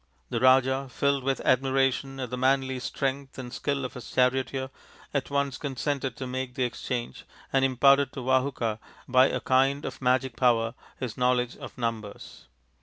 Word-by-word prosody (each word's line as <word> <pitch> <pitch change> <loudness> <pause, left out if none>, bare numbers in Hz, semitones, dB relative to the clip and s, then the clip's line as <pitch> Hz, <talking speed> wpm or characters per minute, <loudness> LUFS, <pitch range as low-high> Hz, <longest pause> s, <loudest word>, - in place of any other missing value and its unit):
The 115 - 0
Raja, 130 +2 +4
filled 140 +1 0
with 135 0 0
admiration 135 +1 +1
at 125 -2 -4
the - - -1
manly 130 0 +1
strength 135 +1 -3
and 125 -1 -7
skill 140 -2 -2
of 130 - -6
his 125 - -9
charioteer, 130 +1 +1 0.4
at 140 -2 -1
once 140 -2 -1
consented 135 -2 -2
to 130 - -4
make 130 0 -4
the 130 - 0
exchange 120 - -4 0.3
and 135 -1 +3
imparted 135 +1 +4
to 135 - -5
Vahuka 130 -4 0 0.3
by 130 +1 +5
a - - -1
kind 135 +2 +2
of - - -6
magic 130 -1 +1
power 115 -2 +2 0.3
his 125 -4 -4
knowledge 125 -1 +1
of - - -10
numbers. 115 - -5
130 Hz, 165 wpm, -27 LUFS, 125-135 Hz, 0.4 s, by